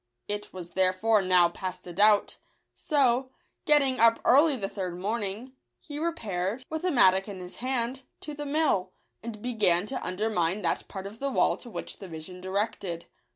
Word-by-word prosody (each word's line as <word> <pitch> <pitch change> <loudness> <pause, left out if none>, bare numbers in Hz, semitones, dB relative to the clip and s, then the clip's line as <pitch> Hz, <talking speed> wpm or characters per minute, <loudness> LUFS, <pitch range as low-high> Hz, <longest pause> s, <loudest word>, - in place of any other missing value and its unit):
It 205 0 -4
was 175 -2 -8
therefore 190 +4 +2
now 185 -2 +4
past 185 +1 -6
a 175 - -8
doubt: 205 +2 +4 0.4
so, 260 -3 +1 0.4
getting 280 -4 +4
up 230 0 +5
early 285 +3 +5
the 200 -6 -3
third 185 -3 -5
morning, 210 +5 -3 0.3
he 295 -2 -7
repaired, 230 - -2
with 315 +1 -3
a - - +3
mattock 190 - +4
in 200 -2 -7
his 180 0 -9
hand, 255 0 -2 0.2
to 300 - -6
the 290 0 -6
mill, 280 -12 +1 0.3
and 220 -2 -8
be 245 0 -2
gan 180 -4 +3
to 260 - -4
undermine 185 -1 0
that - - -1
part 190 -1 -7
of 210 +3 -9
the 275 - -1
wall 265 - +2
to 245 - -11
which - - -6
the 195 - -8
vision 170 +2 -8
directed. 190 -3 -3
210 Hz, 180 wpm, -28 LUFS, 185-255 Hz, 0.4 s, up